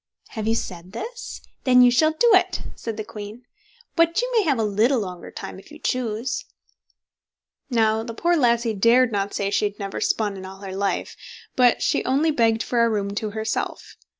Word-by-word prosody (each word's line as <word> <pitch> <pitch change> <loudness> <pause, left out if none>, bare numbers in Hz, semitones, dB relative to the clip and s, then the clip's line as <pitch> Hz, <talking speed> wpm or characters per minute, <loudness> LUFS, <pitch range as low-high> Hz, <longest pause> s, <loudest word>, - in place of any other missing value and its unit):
"Have 220 -2 -4
you 225 - +2
said 180 -3 -5
this? 475 - -7 0.2
then 250 -1 +6
you 245 - +6
shall 310 +5 +3
do 475 +4 +5
it", - - +3
said 225 -2 -6
the 215 - -3
queen; 210 +3 -9 0.5
"but 335 +1 +3
you - - -1
may 450 - +5
have 300 -9 +1
a 225 - +1
little 220 +5 +2
longer 180 -4 -6
time - - -8
if - - -16
you 305 - -10
choose." 250 -3 -2 1.2
Now, 220 -3 +2
the 230 0 -7
poor 345 +7 +2
lassie 235 -5 +2
dared 230 +4 +4
not 200 -1 -2
say 200 0 -1
she 210 - +2
had 205 0 -3
never 195 -1 -5
spun 205 -3 0
in 190 - -8
all 190 +1 -10
her 190 -1 -6
life, 200 0 -2 0.4
but 245 -2 +4
she - - +1
only 285 +5 +2
begged 230 -5 +2
for 235 -1 +1
a 230 - +3
room 200 -2 -1
to 215 +1 -2
herself. 220 +1 -4
225 Hz, 200 wpm, -23 LUFS, 205-255 Hz, 1.2 s, then